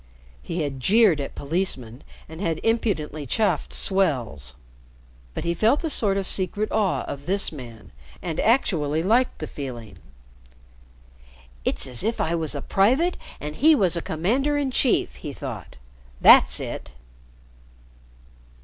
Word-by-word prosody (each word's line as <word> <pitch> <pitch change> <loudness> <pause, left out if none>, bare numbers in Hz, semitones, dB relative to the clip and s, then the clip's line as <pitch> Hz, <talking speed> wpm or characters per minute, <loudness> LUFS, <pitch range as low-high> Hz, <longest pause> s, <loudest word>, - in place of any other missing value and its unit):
He 165 -1 -3
had 140 -2 -4
jeered 195 - +4
at 140 - -7
policemen 140 -6 -2 0.2
and 160 +2 -10
had 165 -5 -1
impudently 170 - -1
chaffed 215 - 0
"swells," 120 - -1 0.8
but - - -4
he 170 - 0
felt 225 - +2
a 320 - -2
sort 200 -7 +2
of 195 - -2
secret 200 +3 0
awe 210 -3 0
of 140 +1 -8
this 195 +2 +2
man, 120 -7 -11 0.3
and 165 -3 -4
actually 165 - +1
liked 235 +7 +2
the 155 - -5
feeling. 125 -7 -8 1.6
"It's - - +1
as 125 +4 +3
if 225 +2 -1
I 165 - 0
was 160 -3 -1
a 140 - -5
private 260 - +2 0.2
and 150 +1 -7
he 315 +2 +5
was 185 - +3
commander 255 - 0
in 280 -2 -1
chief," 250 -1 +1
he 145 -3 -7
thought. 125 -9 -8 0.4
"That's - - +6
it." - - -7
170 Hz, 140 wpm, -23 LUFS, 145-220 Hz, 1.6 s, That's